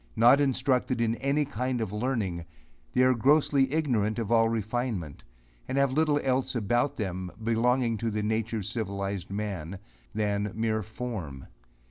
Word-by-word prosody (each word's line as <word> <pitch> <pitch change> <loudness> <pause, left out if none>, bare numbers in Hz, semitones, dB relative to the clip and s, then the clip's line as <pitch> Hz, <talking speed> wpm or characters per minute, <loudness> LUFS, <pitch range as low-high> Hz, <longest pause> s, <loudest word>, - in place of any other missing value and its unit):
Not 120 +5 +6
instructed 130 -2 +1
in 115 -1 +2
any 140 +2 +1
kind 130 -2 -2
of 110 -3 -3
learning, 105 -7 -2 0.5
they 125 - +4
are 130 0 +5
grossly 135 +2 +3
ignorant 120 -9 +1
of 115 -2 -3
all 115 -1 +4
refinement, 110 - -3 0.5
and 130 - -2
have 140 -1 +3
little 150 0 +2
else 130 0 0
about 120 +6 0
them, 95 -3 -3
belonging 115 +1 +2
to 115 +1 -1
the 105 -1 -2
nature 110 +1 -1
of 100 - -4
civilized 100 -3 -3
man, 100 -3 -4 0.4
than 105 -1 -1
mere 110 0 0
form. 105 - -6
115 Hz, 150 wpm, -28 LUFS, 105-130 Hz, 0.5 s, Not